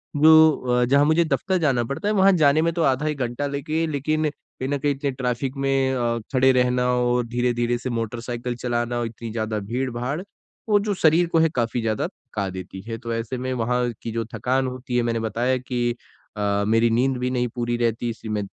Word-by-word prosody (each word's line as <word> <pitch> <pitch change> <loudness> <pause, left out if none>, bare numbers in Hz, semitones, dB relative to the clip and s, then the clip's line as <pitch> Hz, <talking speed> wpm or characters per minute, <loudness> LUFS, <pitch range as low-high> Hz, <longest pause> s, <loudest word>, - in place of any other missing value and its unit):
जो 160 +1 +7 0.3
अ, - - +4
जहाँ 140 +3 +4
मुझे 160 +3 +3
दफ़्तर 185 +4 0
जाना 135 -8 +1
पड़ता 140 - -4
है, 210 - +2
वहाँ 195 -1 +5
जाने 145 +2 +5
में 165 +1 +2
तो 170 - -1
आधा 135 +1 +1
एक 150 -1 -1
घंटा 125 +3 -2
लेके 155 +3 -2
लेकिन 155 +1 0 0.3
कहीं 130 - -3
ना 145 - 0
कहीं 145 +1 0
इतने 140 0 -2
ट्रैफिक 130 +1 -2
में 135 -1 +1
अ, 120 -2 0
खड़े 130 0 +5
रहना 125 -1 +2
और 125 0 +1
धीरे-धीरे 120 0 0
से 125 +2 -5
मोटरसाइकिल 120 +1 -3
चलाना, 120 0 -2
इतनी 115 0 -6
ज़्यादा 110 -1 -2
भीड़-भाड़, 125 - -3 0.5
वो 205 -1 +5
जो 205 0 -1
शरीर 165 +2 +4
को 165 - +3
है 165 0 +4
काफ़ी 120 0 0
ज़्यादा 110 -1 -1
थका 100 -1 -6
देती 95 +1 -8
है। 115 +2 -6
तो 115 0 -5
ऐसे 115 +2 -3
में 130 +1 -3
वहाँ 125 0 0
की 115 - -5
जो 115 +1 -2
थकान 130 +4 0
होती 125 -1 -5
है, - - +3
मैंने 115 -1 0
बताया 115 +4 0
कि 120 -1 -2 0.4
अ, 100 0 0
मेरी 115 +1 +3
नींद 125 +3 +1
भी 125 0 -1
नहीं 125 -1 0
पूरी 120 -1 -1
रहती 120 0 0
इसलिए 110 -1 -6
मैं 105 -1 -1
125 Hz, 210 wpm, -23 LUFS, 115-140 Hz, 0.5 s, जो